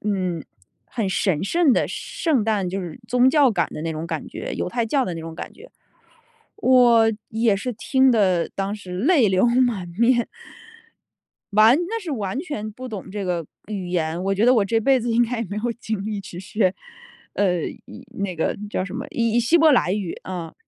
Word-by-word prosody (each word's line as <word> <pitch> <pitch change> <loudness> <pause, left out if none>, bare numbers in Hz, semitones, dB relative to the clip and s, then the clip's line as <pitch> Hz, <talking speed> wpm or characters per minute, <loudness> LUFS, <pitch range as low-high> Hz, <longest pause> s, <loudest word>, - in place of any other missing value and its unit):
嗯， 185 -6 -2 0.4
很 220 -6 -2
神 190 -3 0
圣 335 - +3
的 - - +1
圣 295 -9 -1
诞， 210 -3 0
就 195 +2 -3
是 175 +2 -7
宗 250 +2 +4
教 285 -4 +5
感 180 -6 0
的 150 - -6
那 165 0 -2
种 155 +2 -5
感 160 -2 -4
觉， - - -6
犹 - - -2
太 235 +3 -1
教 270 +2 +1
的 180 - -3
那 165 - -6
种 165 0 -8
感 - - -7
觉。 480 +4 -15 0.9
我 240 - +5 0.2
也 225 -2 +2
是 230 +6 -3
听 260 +4 +3
得 185 -7 +2
当 195 +1 -2
时 185 -4 -8
泪 270 - +4
流 190 +3 +3
满 240 -6 +1
面。 240 0 +3 1.3
完 220 +5 +6
那 455 +2 -3
时 340 - -6
完 210 -3 -3
全 220 - -5
不 255 +3 -8
懂 200 -4 -7
这 205 0 -4
个 175 -3 -2 0.2
语 195 -4 -4
言， 170 0 -1
我 195 0 +1
觉 210 +5 +2
得 255 - +6
我 210 -4 +3
这 225 +3 +1
辈 265 +4 +3
子 235 +1 -2
应 235 +1 +4
该 240 +1 -3
也 - - -1
没 200 - -4
有 240 - +1
精 220 -3 -4
力 215 -2 -3
去 180 -2 -9
学， 190 -1 0 0.6
呃， 180 -5 +1 0.2
以 - - -12
那 195 -2 -2
个 160 - -1
叫 185 - -1
什 190 - -8
么， - - -4
以 230 -1 0
以 240 - +4
希 280 +9 +3
伯 320 -1 +6
来 185 -7 +3
语， 195 -4 -3
啊。 175 -3 -6
210 Hz, 225 characters per minute, -22 LUFS, 185-245 Hz, 1.3 s, 完